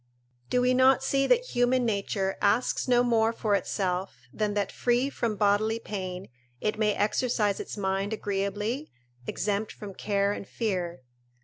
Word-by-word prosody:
["Do 250 - +2
we 250 0 +3
not 260 +1 +5
see 275 0 +2
that - - +3
human 245 +1 +2
nature 200 -2 -1
asks 215 +7 +2
no 245 -1 +4
more 225 -2 +3
for 220 -2 -1
itself 185 - -1
than 210 -1 -1
that, 205 -1 0
free 245 +3 +1
from 230 -5 -1
bodily 210 +2 +2
pain, 190 -4 -5 0.3
it 215 +6 -1
may 210 -2 +2
exercise 210 -1 +1
its - - -6
mind 195 +1 -1
agreeably, 210 +6 -2 0.4
exempt 205 +1 -1
from 205 -2 -9
care 200 0 0
and 200 - -5
fear." 180 - -3
210 Hz, 150 wpm, -28 LUFS, 200-245 Hz, 0.4 s, not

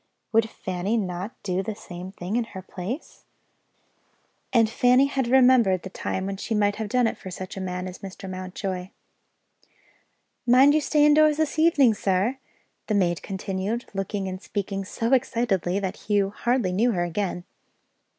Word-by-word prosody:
Would 225 0 +3
Fanny 190 +4 -2
not 185 -1 -3
do 185 -1 0
the 210 +2 -4
same 180 -1 -9
thing, 190 +2 -5
in 240 - +2
her 190 -4 -9
place? 200 - -7 1.3
And 230 -3 +4
Fanny 250 +4 +4
had 270 -3 -1
remembered 245 -8 +5
the 190 - -7
time 190 -1 -3
when 195 0 -3
she 220 +3 -3
might 205 -1 +2
have 220 -1 -4
done 250 +2 +3
it 225 - -1
for 190 - -8
such 185 +1 -7
a 195 - -5
man 180 0 -3
as 185 - -8
Mr. 195 0 -9
Mountjoy. 185 0 -5 1.6
"Mind 260 +4 +7
you 310 - +3
stay 295 0 +3
indoors 300 0 +5
this 315 0 0
evening, 290 -7 +5
sir," 205 +6 0 0.5
the 215 - +1
maid 175 -4 +1
continued, 195 +4 -3
looking 195 0 -3
and 185 0 -5
speaking 195 -1 -3
so 230 +6 -1
excitedly 230 -8 +1
that 190 -2 -3
Hugh 200 -2 0
hardly 240 -3 0
knew 225 +6 +2
her 175 -2 0
again. 175 +1 -2
200 Hz, 165 wpm, -25 LUFS, 185-240 Hz, 1.6 s, Mind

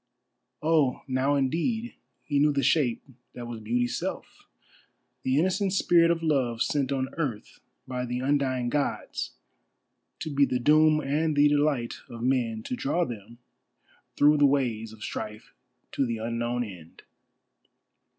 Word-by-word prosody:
Oh, 155 -5 +2
now 135 +2 +1
indeed 170 - -1 0.3
he 145 -1 0
knew 150 +1 +4
the 140 -1 0
shape 135 -3 +2 0.3
that 120 - -6
was 120 -1 -6
Beauty's 120 +3 -1
self—the 130 +1 -7
innocent 190 +4 +1
Spirit 170 -3 +4
of 170 -1 0
Love 130 -7 +1
sent 140 -2 -1
on 130 -1 -2
earth 125 -10 -4 0.3
by 125 -1 -3
the 125 +1 -2
undying 130 -2 0
Gods 145 +2 -2 0.8
to 155 - -5
be 140 0 +4
the 125 -2 +2
doom 155 +4 +4
and 150 +2 0
the 145 +1 +6
delight 145 -5 +1
of 115 0 -7
men; 120 -4 0
to - - -3
draw 255 -8 0
them 115 -2 -9 0.8
through 150 +1 +5
the 145 -1 +6
ways 120 -6 0
of 110 -1 -11
strife 110 0 -6 0.4
to 135 - 0
the 115 -1 -2
unknown 120 +2 -2
end. 90 -7 -11
135 Hz, 140 wpm, -27 LUFS, 120-150 Hz, 0.8 s, the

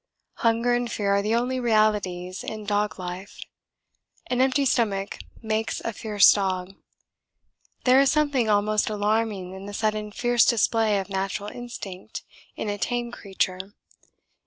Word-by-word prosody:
Hunger 230 +1 +2
and 240 -1 -1
fear 200 -2 0
are 200 0 +3
the 215 +3 0
only 250 +2 0
realities 210 -6 +1
in 215 -1 -6
dog 210 0 0
life: 185 +2 -7 0.9
an 250 0 +2
empty 270 +2 +2
stomach 205 -6 0 0.2
makes 220 0 -1
a 230 - -3
fierce 210 -2 +5
dog. 190 -2 -2 1.1
There 260 +1 +6
is 275 - +4
something 285 -7 +1
almost 210 +1 +2
alarming 210 -3 -1
in 190 +1 -9
the 205 - -6
sudden 215 -1 -1
fierce 240 +2 +3
display 225 -2 +2
of 195 0 -4
natural 195 +1 -3
instinct 205 -6 -8 0.3
in - - -4
a 205 0 -3
tame 240 +5 -2
creature. 190 -2 -3
215 Hz, 140 wpm, -25 LUFS, 195-235 Hz, 1.1 s, There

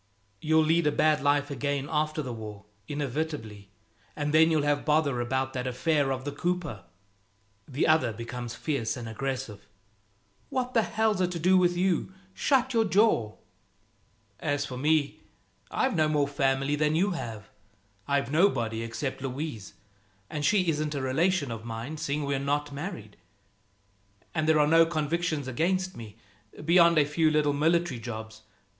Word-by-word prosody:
"You'll 160 +1 +3
lead 160 +1 +2
a - - +3
bad 155 0 +2
life 145 0 +1
again 140 +1 -2
after 155 0 -1
the 125 -3 -5
war, 105 -3 -8 0.2
inevitably; 140 -8 -4 0.5
and 145 0 -2
then 160 +1 +6
you'll 155 -3 +2
have 145 0 +1
bother 150 -5 +1
about 130 +2 -1
that 130 -1 -3
affair 140 +2 +1
of 130 0 -3
the 145 - -2
cooper." 165 - -3 0.8
The 140 +1 0
other 155 -7 +3
becomes 115 +1 -6
fierce 140 -7 -2
and 120 -2 -6
aggressive. 125 -3 -5 0.8
"What 255 -1 -2
the 230 - +4
hell's 220 -3 0
it 180 - +2
to 170 - -4
do 185 +4 +4
with 175 -1 +3
you? 185 -1 +1 0.2
Shut 260 +1 +1
your 225 -1 +3
jaw!" 195 - +2 1.0
"As 145 -2 -1
for 130 - -7
me, 150 +2 +1 0.5
I've 260 -4 0
no 155 -2 +3
more 150 -2 +1
family 135 0 0
than 150 +1 +1
you 195 +5 +2
have. 115 - -6 0.6
I've 140 -2 0
nobody, 120 - +2
except 115 +4 -4
Louise 135 -5 -5 0.6
and 150 -1 -3
she 190 +2 +3
isn't 150 -1 -1
a 140 - -2
relation 150 +2 +1
of 115 -1 -6
mine, 115 +6 -6
seeing 150 -1 -2
we're 140 -1 -1
not 145 +1 -1
married. 140 - -7 1.2
And 155 -1 0
there 155 -1 +5
are 150 - +5
no 165 +2 +6
convictions 155 -2 -1
against 185 +8 0
me, 110 -2 -10 0.5
beyond 170 0 +5
a 150 - +5
few 155 +2 +2
little 150 -1 +2
military 160 -2 +1
jobs. 110 -1 -7
145 Hz, 160 wpm, -28 LUFS, 130-160 Hz, 1.2 s, then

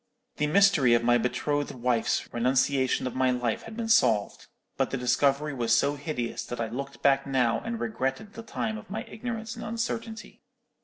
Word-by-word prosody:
"The 150 - +1
mystery 165 -8 +5
of 115 - +1
my 120 0 +4
betrothed 145 +4 -1
wife's 120 -2 0
renunciation 130 +2 +1
of 130 - -3
my 130 0 +2
love 125 -3 -1
had 225 0 -10
been 230 -1 -3
solved; 110 - +2 0.3
but - - 0
the 135 - -2
discovery 140 +4 +1
was 115 -3 +2
so 140 +3 +2
hideous 140 -5 -4
that 120 - -6
I 115 -1 -2
looked 140 +4 -6
back 140 0 +3
now 125 -4 +2
and 230 0 -5
regretted 200 +2 -3
the 230 - -8
time 220 -1 -3
of 220 - -15
my 220 +3 -4
ignorance 225 -1 -6
and - - -7
uncertainty. 230 0 -5
140 Hz, 185 wpm, -27 LUFS, -, 0.3 s, mystery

